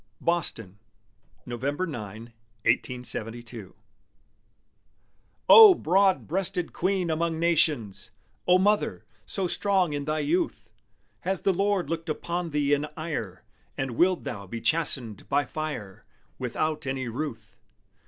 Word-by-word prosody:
BOSTON 115 - -2 0.7
[November 140 +8 -2
9, 115 - -8 0.3
1872] 120 -4 -2 1.7
O 430 -4 +10
broad 190 - +2
breasted 185 0 -2
Queen 185 -2 0
among 165 +1 -1
Nations! 150 - 0 0.4
O 180 0 +6
Mother, 205 +3 +1 0.2
so 195 - +1
strong 185 -2 +2
in 145 -1 -3
thy 155 +1 -1
youth! 335 - -1 0.5
Has 190 -1 -2
the 195 - +2
Lord 195 -2 +1
looked 165 +1 -4
upon 170 +2 -3
thee 145 -1 +1
in 145 +1 +1
ire, 115 - -5 0.3
And 135 -2 -2
willed 180 +9 +2
thou 100 -2 -6
be 115 +5 -5
chastened 130 -8 -1
by 145 +1 +2
fire, 145 -12 -6 0.4
Without 150 +4 -2
any 130 -1 -2
ruth? 130 +1 -6
155 Hz, 115 wpm, -27 LUFS, 120-180 Hz, 1.7 s, O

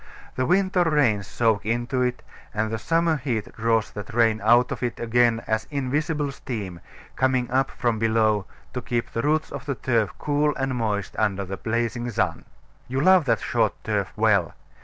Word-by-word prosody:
The 130 - 0
winter 185 0 +3
rains 130 - +2
soak 110 -1 +1
into 120 +4 -1
it; 125 0 -1 0.3
and 110 +1 0
the 110 - -2
summer 165 +3 +1
heat 120 -6 -3
draws 115 -1 +1
that 105 +3 -8
rain 115 -2 +3
out 120 +3 +4
of - - -4
it 120 -2 -2
again 120 0 +2
as 110 0 -1
invisible 145 +2 -1
steam, 105 -10 -6 0.4
coming 130 -2 +1
up 135 +1 +2
from 120 -3 -1
below, 110 -3 +2 0.3
to 125 - -3
keep 120 -1 -2
the 115 - -1
roots 155 +3 0
of 140 +1 -7
the 140 - -1
turf 115 -3 0
cool 150 0 +1
and 135 -1 -1
moist 105 -5 -2
under 100 -2 0
the 95 +1 -5
blazing 120 +1 -2
sun. 95 -7 -1 0.4
You 130 +2 -2
love 185 +2 +5
that 115 -4 +1
short 110 -5 +1
turf 100 -3 -1
well. 105 -6 +2
120 Hz, 180 wpm, -24 LUFS, 110-135 Hz, 0.4 s, love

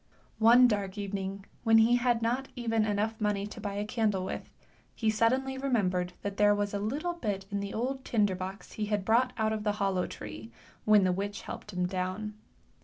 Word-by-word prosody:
One 240 +3 +7
dark 205 -3 -1
evening 195 -1 -4 0.2
when 225 -1 +6
he 230 +2 +5
had 240 -2 +1
not 250 +4 0
even 225 -3 +1
enough 215 +2 -1
money 205 -1 0
to 215 +2 -9
buy 200 -1 -4
a 205 +1 -2
candle 210 -4 0
with, - - -5 0.5
he 220 -2 +1
suddenly 260 +4 +1
remembered 185 -9 0
that 200 0 -4
there 205 0 +5
was 205 0 -1
a 200 - -1
little 285 - -2
bit 205 - -3
in 200 - -1
the 200 0 -4
old 260 +4 -2
tinder 210 -6 +2
box 185 +2 -6
he 215 - -3
had 205 -2 -1
brought 235 +4 +3
out 220 -1 +1
of 215 -1 -3
the 210 -1 +1
hollow 195 -3 0
tree, 110 +1 -8 0.3
when 210 -2 +6
the 185 - +3
witch 200 +2 -3
helped 210 - -7
him 180 -1 -1
down. 185 +3 -3
210 Hz, 200 wpm, -30 LUFS, 195-230 Hz, 0.5 s, One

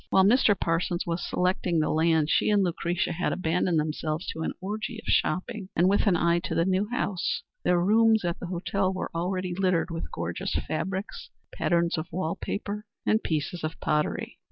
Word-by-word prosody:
While 190 - +5
Mr. 205 -1 +4
Parsons 170 +1 0
was 170 0 -2
selecting 180 -1 0
the 155 - +1
land, 160 -1 +3
she - - +3
and 205 -2 +4
Lucretia 175 0 -1
had 180 +3 -1
abandoned 175 -1 +1
themselves 155 +1 -2
to 160 - -5
an - - -1
orgy 215 +4 -4
of 225 - -11
shopping, 185 +4 0
and 175 +3 +4
with 200 +3 +3
an 190 - +5
eye 170 0 +3
to 185 - -4
the 165 - +2
new 190 +3 +1
house, 200 -7 -1 0.2
their 180 -1 +3
rooms 220 +2 +4
at 170 -1 -1
the 180 - -5
hotel 185 +2 -1
were 185 - -4
already 180 +2 -2
littered 185 -2 +1
with 165 0 -4
gorgeous - - -3
fabrics, 190 +5 -4 0.2
patterns 170 -2 +1
of 155 - -7
wall 170 -1 -2
paper 210 +1 -4 0.2
and 220 - +3
pieces 160 +2 -2
of 155 +1 -4
pottery. 150 0 -1
180 Hz, 185 wpm, -27 LUFS, 165-195 Hz, 0.2 s, While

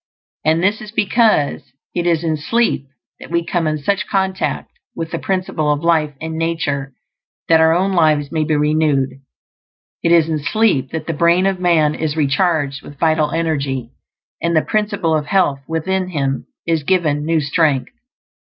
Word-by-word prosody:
And 160 +3 +2
this 205 +4 +1
is 215 - -8
because 210 - +2 0.3
it 175 0 -1
is 170 -1 +1
in 160 -1 0
sleep 155 -2 0 0.3
that - - -11
we 170 0 0
come 170 -2 -1
into 155 -1 -2
such 195 +3 0
contact 190 -1 -1 0.2
with 165 0 -5
the - - -3
Principle 180 -5 -1
of 145 +1 -1
Life 155 -3 +2
in 160 0 -5
nature 145 -5 -2 0.5
that 165 -1 +5
our 160 0 +4
own 190 +2 +1
lives 155 -4 +2
may 160 -2 0
be 155 0 0
renewed. 150 -3 +1 0.8
It 170 - +1
is 165 -2 +5
in 160 -2 -1
sleep 145 - +1
that 160 +2 -5
the 165 - -2
brain 170 +4 +3
of 195 -1 0
man 165 -4 +3
is 155 0 -3
recharged 145 -1 +1
with 145 - -12
vital 155 -1 +2
energy, 140 -7 -2 0.5
and 170 0 0
the 155 - +3
Principle 205 -6 0
of 150 -1 -2
Health 150 -7 +2
within 185 +4 -1
him 140 -6 -2 0.2
is 165 -2 +1
given 150 -3 +1
new 165 +1 +1
strength. 145 -2 +1
160 Hz, 170 wpm, -18 LUFS, 150-175 Hz, 0.8 s, that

